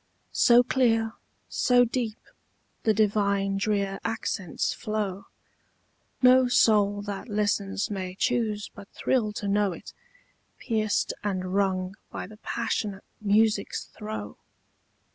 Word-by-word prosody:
So 240 0 +6
clear, 225 -3 +2 0.3
so 245 -1 +3
deep, 230 -2 -2 0.6
the 220 - +3
divine 200 -2 +1
drear 200 -1 0
accents 220 -6 -2
flow, 205 -3 -3 1.0
No 255 0 +7
soul 205 -4 +3
that 205 +3 -6
listens 205 -1 0
may 185 -2 -4
choose 215 -1 -1
but 200 - -12
thrill 230 -5 0
to 205 - -4
know 200 -1 +2
it, - - -11 0.6
Pierced 215 -3 0
and 185 -2 -2
wrung 190 -1 0
by - - -5
the 210 +2 -13
passionate 205 -2 -3 0.2
music's 210 0 +2
throe. 210 - -6
210 Hz, 110 wpm, -27 LUFS, 195-225 Hz, 1.0 s, No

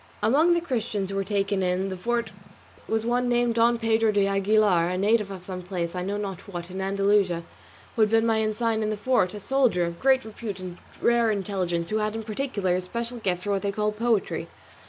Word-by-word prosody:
Among 315 +9 +4
the 340 - +1
Christians 220 - -2
who - - -4
were 195 - 0
taken 195 0 0
in 185 +1 0
the 190 - -4
fort 235 +3 -2 0.6
was 220 0 0
one 245 +1 +1
named 240 -1 +2
Don 235 +1 +3
Pedro 225 -1 +2
de 205 -1 +2
Aguilar, 195 -3 +3
a 180 - -2
native 210 +1 +2
of 185 -2 -8
some 185 -1 -5
place, 175 -2 -4
I 180 - -3
know 200 +3 -2
not 195 -3 -4
what, 175 0 -6
in 190 +1 -4
Andalusia, 195 -3 +1 0.5
who 225 - +1
had 215 - +5
been 225 +1 +3
ensign 220 0 +1
in 215 - 0
the 215 - -2
fort, 205 -6 +1
a - - -6
soldier 240 -7 +2
of 170 0 -5
great 265 -1 +3
repute 215 -2 -6
and 180 -1 -8 0.2
rare 235 -1 +4
intelligence, 185 -4 -2
who 215 - +1
had 215 0 -1
in 225 - -4
particular 215 -4 -1
a 185 - -1
special 235 +6 -5
gift 180 -4 -1
for 205 - -2
what 195 -1 0
they 200 - -1
call 210 +1 0
poetry. 225 -1 0
210 Hz, 220 wpm, -26 LUFS, 190-230 Hz, 0.6 s, had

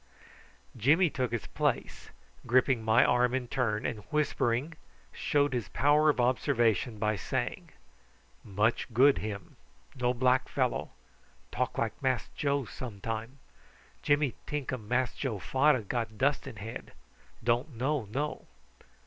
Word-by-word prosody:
Jimmy 150 - +4
took 125 -3 -2
his 120 -2 -3
place, - - -2 0.4
gripping 125 0 +3
my 110 +2 +5
arm 125 +1 +3
in 130 -2 -2
turn, 115 -5 -1
and, 115 - -2
whispering, 150 -2 0 0.4
showed 145 -1 +1
his 120 -6 -2
power 150 +2 +4
of 145 - +1
observation 120 -3 +1
by 105 0 0
saying: 95 - -3 0.7
"Much 110 +5 0
good 135 +3 +6
him. 100 -3 -6 0.4
No 125 -2 0
black 130 +1 +2
fellow. 130 -3 -1 0.6
Talk - - -2
like 110 -1 -2
Mass 130 -5 0
Joe 140 -2 -1
some 110 -2 -8
time. 115 +5 -5 0.6
Jimmy 145 -3 +2
tink 145 -3 -3
um 110 -5 -6
Mass 125 +1 +1
Joe 125 -7 -2
fader 135 +5 +2
got 110 +1 -3
dust 140 +3 +1
in 130 - -7
head. 105 +2 -8 0.5
Don't 120 +4 0
know 135 0 0
know." 140 +9 -4
125 Hz, 135 wpm, -30 LUFS, 115-140 Hz, 0.7 s, good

